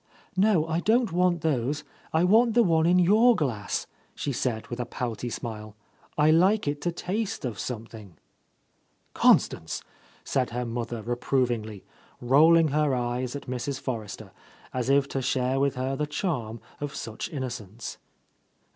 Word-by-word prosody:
"No, 190 -4 +3
I 165 +1 -1
don't 225 +4 +2
want 175 -1 +2
those. 145 -1 0 0.3
I 160 +2 +2
want 225 +5 +4
the 240 - +6
one 165 -4 +3
in 180 +1 +4
your 215 +7 +5
glass," 115 - -2 0.3
she 140 - -3
said 120 -3 -2
with 120 - -5
a 125 - -1
pouty 120 0 -4
smile. 110 -3 -6 0.4
"I 155 +1 +5
like 185 +4 +3
it 145 0 -2
to 175 - 0
taste 195 +2 -3
of 110 -6 -4
something 110 -2 -6
1" 85 - -21 1.0
"Constance!" - - +2 0.4
said 130 -2 0
her 125 +1 -3
mother 115 -1 -4
reprovingly, 120 -3 -1 0.4
rolling 155 +6 +5
her 150 -1 +1
eyes 125 +1 -2
at 140 - -6
Mrs. 130 +2 -3
Forrester, 115 -6 -5 0.4
as 125 0 -2
if 140 0 +4
to 135 - -2
share 130 +1 0
with 140 0 +1
her 130 +1 -2
the 150 +2 -2
charm 125 - -3 0.2
of 145 -1 -5
such 110 -2 -5
innocence. 120 - -6
135 Hz, 155 wpm, -27 LUFS, 120-165 Hz, 1.0 s, the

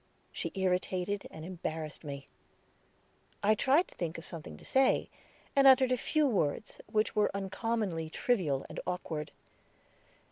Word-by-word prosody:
She - - -4
irritated 185 +1 0
and 160 0 -9
embarrassed 160 -4 -5
me. 140 -2 -6 1.2
I 210 +2 +6
tried 280 - +3
to - - -16
think 165 -2 -3
of 165 - -8
something 165 -3 -7
to - - -14
say, 265 0 +3 0.4
and 275 -1 +7
uttered 260 -1 +7
a - - +5
few 305 +4 +1
words, 200 - 0
which 215 0 +1
were 210 -1 +4
uncommonly 195 -4 -1
trivial 160 - 0
and - - -7
awkward. 160 -4 -3
190 Hz, 140 wpm, -32 LUFS, 160-235 Hz, 1.2 s, and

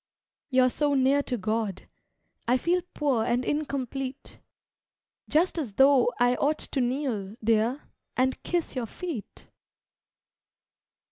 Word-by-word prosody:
You're 255 -2 +4
so 290 +1 +1
near 270 +2 +4
to 250 -3 -2
God, 215 -2 -2 0.6
I 250 +2 +4
feel 350 +6 +1
Poor 275 -7 +1
and 245 +2 0
incomplete, 270 -2 -3 0.9
Just 335 +3 +2
as 250 -10 -4
though 270 +1 +5
I 245 0 +4
ought 300 +2 +1
to 270 - -2
kneel, 240 -6 -2
Dear, 225 +5 +2 0.3
and 260 +1 +1
kiss 345 -4 -2
your 245 -3 -2
feet. 320 - -7
260 Hz, 120 wpm, -27 LUFS, 240-285 Hz, 0.9 s, though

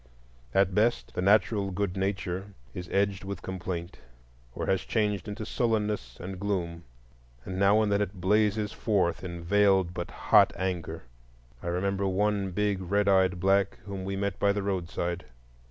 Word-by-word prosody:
At 95 -1 +3
best, 110 +4 +1
the - - -2
natural 100 +1 +3
good 95 0 -2
nature 95 0 -3 0.2
is 90 -1 -6
edged 100 -1 +1
with 100 -1 -6
complaint 90 -2 -5 0.6
or - - -3
has 95 - +1
changed 105 -3 -1
into 105 +1 -5
sullenness 105 - -1
and 95 +1 -6
gloom. 85 -5 -2 0.6
And 95 0 -4
now 100 +2 +5
and 105 - 0
then 100 0 +2
it 100 -2 -3
blazes 105 +2 +2
forth 95 -7 0
in 85 -2 -6
veiled 95 -1 +3
but 85 -1 -4
hot - - +4
anger. 85 -3 -3 0.6
I - - -6
remember 95 +3 0
one 100 +1 +1
big 100 +1 0
red 100 +3 +1
eyed 95 -2 +3
black 95 +1 +2
whom 100 -2 -5
we 95 +1 -3
met 100 -1 -2
by 100 - +4
the 100 0 -2
roadside. 90 -2 -2
95 Hz, 160 wpm, -28 LUFS, 90-100 Hz, 0.6 s, now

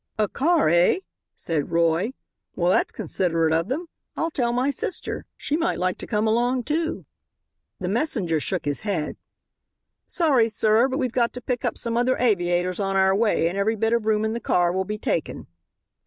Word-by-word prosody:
"A 215 -1 +2
car, 320 - +2
eh?" 175 - +4 0.3
said 160 -4 -2
Roy; 170 +7 +1 0.4
"well, 175 0 +2
that's - - +2
considerate 165 -3 0
of 165 +2 +1
them. 305 +9 -2 0.3
I'll 330 - -1
tell 240 -5 0
my 250 +4 +1
sister. 435 +5 -4
She 295 - -2
might 335 +2 0
like 185 0 -1
to - - -7
come 215 -1 0
along, 240 +3 +1
too." 320 +5 -2 0.7
The 185 - -4
messenger 200 - 0
shook 180 +2 -3
his 145 -1 -1
head. 185 -8 -2 0.9
"Sorry, 275 -10 +2
sir; 220 +3 +3
but 265 0 -2
we've 255 -4 -1
got 235 -1 +1
to 250 - -6
pick 250 -1 -3
up 240 -3 -1
some 235 -1 -2
other 245 +2 +2
aviators 180 -5 +1
on 195 -1 -1
our 190 0 +4
way 210 -6 +2
and 185 +4 -2
every 220 +3 +1
bit 225 +1 0
of 230 -2 0
room 215 0 +2
in 220 - -1
the 235 - -3
car 175 -6 +2
will 190 +1 -1
be 210 +1 -4
taken." 170 - -2
215 Hz, 190 wpm, -24 LUFS, 180-250 Hz, 0.9 s, eh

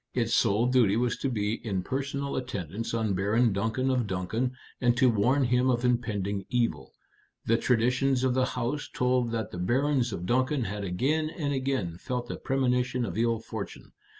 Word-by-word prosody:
Its 115 -2 +1
sole 110 +1 +3
duty 120 -5 +3
was 120 0 +1
to 135 - -2
be 110 -1 -2
in 95 -5 -2
personal 140 +2 -3
attendance 115 -3 -4
on 110 -3 0
Baron 105 +4 +2
Duncan 115 +6 0
of 125 -4 0
Duncan, 110 +7 -2 0.3
and 120 -1 +3
to 130 -1 +5
warn 120 +6 +2
him 125 +1 +2
of 120 -1 +1
impending 105 -5 0
evil. 115 - -1 0.5
The 115 - +3
traditions 125 +3 +2
of 130 -1 +2
the 130 0 +2
house 125 +5 -2
told 125 -1 +1
that 110 -2 -3
the 90 - -6
Barons 130 +5 +1
of 90 -3 -4
Duncan 130 +5 +1
had 105 -1 -4
again 140 - 0
and 145 -3 -2
again 130 -11 -2
felt 125 +1 -4
a - - -4
premonition 125 -2 0
of 90 - -5
ill 115 +1 +2
fortune. 110 - -7
120 Hz, 180 wpm, -28 LUFS, 105-130 Hz, 0.5 s, to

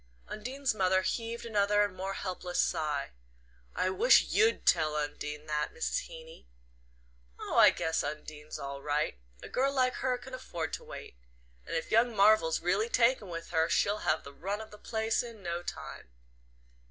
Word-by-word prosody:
Undine's 260 +5 -2
mother 185 -2 +2
heaved 230 +4 -3
another 205 -2 +3
and 200 -2 -2
more 195 +1 -4
helpless 180 -2 -4
sigh. 150 -3 0 0.6
"I 185 0 +1
wish - - +6
YOU'D 445 +2 +3
tell 155 -3 +3
Undine 150 0 -4
that, 150 -1 -1
Mrs. 160 - -1
Heeny." 160 - -12 0.9
"Oh, - - -4
I - - +9
guess 160 0 -1
Undine's 150 +1 -6
all 140 0 -6
right. 145 - -1 0.2
A - - -7
girl 270 +2 +1
like 255 -2 +2
her 255 -1 0
can 255 +1 -12
afford 170 - -5
to - - -4
wait. - - -10 0.5
And - - -3
if 165 - -3
young 230 +1 +3
Marvell's 200 -5 +4
really 200 +6 +1
taken 235 -4 +2
with 165 -1 -6
her 160 -1 +2
she'll 205 +1 +2
have 155 - 0
the 140 - -11
run 195 +7 -3
of 220 0 -9
the 210 - -12
place 220 0 0
in 230 -4 -10
no 170 0 -2
time." 175 - -7
185 Hz, 170 wpm, -31 LUFS, 155-225 Hz, 0.9 s, I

